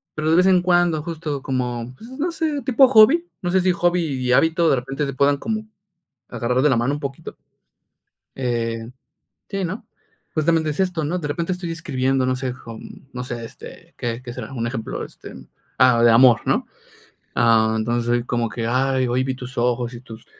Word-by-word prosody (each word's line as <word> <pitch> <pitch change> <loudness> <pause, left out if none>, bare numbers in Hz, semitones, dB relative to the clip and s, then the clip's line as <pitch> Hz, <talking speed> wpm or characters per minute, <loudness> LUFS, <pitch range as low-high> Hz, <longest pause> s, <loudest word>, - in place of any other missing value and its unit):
pero, 155 +1 0
de - - +5
vez 185 - +5
en 185 -2 +5
cuando 175 -3 +2
justo 155 -4 -4
como, 125 -2 -3
pues, 230 - -12
no 300 +6 -2
sé, 310 -3 -2
tipo 265 0 +5
hobby, 265 +9 +6 0.2
no 175 - -1
sé, 190 +1 +3
si 185 0 +3
hobby 175 0 +1
y 130 -5 -2
hábito 165 +5 +3
de 135 - +3
repente 135 +4 -3
se 140 - -4
puedan 140 +2 +2
como 215 +4 -4 0.6
agarrar 125 +2 -1
de 150 - +4
la 130 - +3
mano 125 +5 0
un 145 - -6
poquito. 140 -2 -6 1.0
Eh, 115 -2 -2 0.6
sí, 195 -2 -3
¿no?, 185 +6 -5 0.5
justamente 160 0 +1
es 150 - -3
esto, 180 -4 0
¿no?, 175 +5 -1
de 150 - -4
repente 165 +5 -2
estoy 180 -2 -4
escribiendo, 135 -5 0
no 130 0 0
sé, 130 -1 -3
con 115 +2 -11
no 125 0 -5
sé, 120 -2 -6
este, 115 - -12
¿qué 115 0 -3
qué 120 -1 -7
será?, 120 0 -7
un 115 -3 -3
ejemplo, 115 -2 -4
este, - - -12 0.4
ah, 125 -2 +5
de 120 - +7
amor, 120 0 +6
¿no?, - - +1 0.7
ah, 110 -1 +4
entonces 120 +1 -1
soy 120 0 +1
como 120 -2 -1
que: 115 +1 -4
"Ay, 130 +1 +1
hoy 125 +2 +1
vi 130 0 -2
tus 125 +1 -9
ojos 120 0 0
y 120 - -8
tus 115 -3 -12
135 Hz, 200 wpm, -21 LUFS, 120-170 Hz, 1.0 s, de